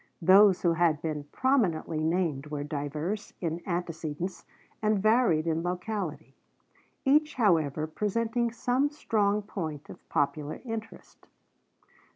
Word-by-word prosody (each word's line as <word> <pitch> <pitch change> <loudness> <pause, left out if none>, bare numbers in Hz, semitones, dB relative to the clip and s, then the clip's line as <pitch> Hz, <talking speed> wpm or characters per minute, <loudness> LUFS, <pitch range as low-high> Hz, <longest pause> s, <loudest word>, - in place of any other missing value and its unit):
Those 190 +2 +6
who 170 -2 +4
had 165 -2 +2
been 150 -3 -3
prominently 175 - +1
named 160 -4 0
were 150 -1 -4
diverse 150 +8 -4
in 170 -1 -3
antecedents 170 -1 -4 0.4
and 215 -1 +2
varied 215 -6 +3
in 165 0 0
locality, 180 -5 -4 0.7
each 300 +3 +3
however 160 - +2
presenting 230 +7 -1
some 250 +4 +1
strong 210 -8 0
point 160 -8 -6
of - - -15
popular 145 +1 -1
interest. 225 -1 -8
175 Hz, 115 wpm, -28 LUFS, 155-215 Hz, 0.7 s, Those